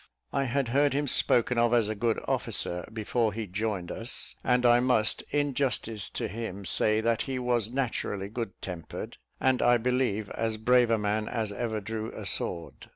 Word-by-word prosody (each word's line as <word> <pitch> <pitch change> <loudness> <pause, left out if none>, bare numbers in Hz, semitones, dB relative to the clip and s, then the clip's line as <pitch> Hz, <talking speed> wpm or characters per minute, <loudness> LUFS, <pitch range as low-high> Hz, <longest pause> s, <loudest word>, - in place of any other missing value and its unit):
I 140 -1 +1
had 130 0 0
heard 140 +3 +3
him 145 +1 0
spoken 125 -2 +4
of 120 0 +3
as 115 -3 +3
a 110 - -1
good 115 +1 0
officer, 90 +2 -1
before 110 0 0
he 110 0 -4
joined 100 -2 -3
us; 115 +3 -4
and 125 0 +2
I 120 0 +6
must, 125 -3 +2
in 145 -1 0
justice 120 -5 -1
to - - -3
him, 100 -2 -6
say 110 +5 +3
that 115 0 +1
he 130 - -2
was 120 -3 0
naturally 115 -6 -2
good 115 -1 -5
tempered, 90 -3 -6 0.2
and 130 -1 +2
I 120 0 +5
believe 120 -4 0
as 110 -1 -2
brave 120 +2 +4
a 115 - +3
man 105 +1 -1
as 110 -3 -2
ever 110 +1 -2
drew 110 +2 -5
a - - -7
sword. 85 -1 -2
115 Hz, 185 wpm, -28 LUFS, 105-125 Hz, 0.2 s, I